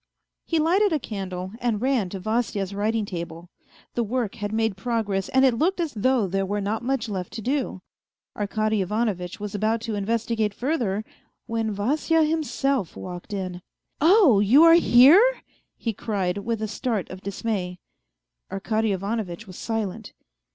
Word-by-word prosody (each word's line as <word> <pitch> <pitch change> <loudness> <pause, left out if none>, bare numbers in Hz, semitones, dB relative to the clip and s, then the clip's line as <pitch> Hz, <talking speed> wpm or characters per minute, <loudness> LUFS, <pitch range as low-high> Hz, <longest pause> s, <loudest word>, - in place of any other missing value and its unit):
He 330 - +1
lighted 365 +6 +3
a 315 - +2
candle, 190 -7 -5
and 235 -4 0
ran 250 -6 +1
to 195 - -6
Vasya's 210 -2 -1
writing 215 +2 0
table: 170 -2 -7 0.4
the 240 - 0
work 235 -1 -2
had 205 -3 -4
made 225 -2 0
progress 205 -2 -1
and 265 +1 +4
it 260 - +4
looked 365 +4 +1
as 330 -4 -1
though 245 +1 +2
there 195 +1 -1
were 205 +2 -2
not 210 +3 -2
much 250 -1 -1
left 190 -4 -4
to 225 - -5
do. 255 -7 -2 0.5
Arkady 215 0 0
Ivanovitch 190 -3 -2
was 210 -1 -5
about 215 +2 +1
to 225 -1 -4
investigate 220 0 -1
further, 235 -7 -1 0.4
when 225 -1 -1
Vasya 295 +10 +1
himself 280 - 0
walked 180 +2 -8
in.... 185 -3 -4 0.4
"Oh, 330 - +6
you 235 +10 +6
are 330 0 +8
here? 345 - +6
" - - -43
he 225 - +1
cried, 195 -3 -2
with 225 +1 -3
a - - -1
start 215 -2 -2
of 185 0 -8
dismay. 195 -2 -3 0.7
Arkady 215 +2 0
Ivanovitch 200 0 -3
was 185 -3 -11
silent. 220 -1 -4
220 Hz, 160 wpm, -24 LUFS, 195-245 Hz, 0.7 s, are